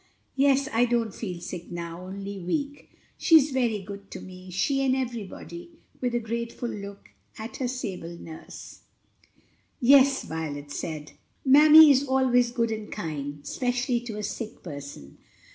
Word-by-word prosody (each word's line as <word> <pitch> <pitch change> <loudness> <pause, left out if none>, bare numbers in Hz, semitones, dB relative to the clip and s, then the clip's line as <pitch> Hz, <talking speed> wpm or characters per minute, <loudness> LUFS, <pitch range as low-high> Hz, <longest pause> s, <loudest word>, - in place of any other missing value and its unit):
"Yes, 275 0 +3
I 235 +2 +4
don't 235 -3 0
feel 180 -6 -5
sick 175 0 -7
now, 170 +1 -6
only 200 +1 -6
weak. 285 - -3 0.3
She's 305 -3 +6
very 235 -6 0
good 200 0 -9
to - - -7
me, 185 0 -11
she 270 +10 0
and 260 -1 +2
everybody," 260 - -5 0.3
with 245 -1 0
a - - +2
grateful 235 +1 -4
look 200 -2 -8 0.3
at 220 +2 -7
her 260 - -1
sable 185 -9 -5
nurse. 160 -1 -10 1.0
"Yes," 275 +1 +6
Violet 145 -3 -5
said, 150 0 -5 0.3
"mammy 300 +3 +9
is 270 0 +4
always 255 -2 +3
good 235 -2 0
and 215 -1 -5
kind, 145 -6 -5
especially 245 - -1
to 235 -3 -7
a 210 - -4
sick 225 +2 -6
person. 140 - -9
225 Hz, 145 wpm, -26 LUFS, 180-260 Hz, 1.0 s, mammy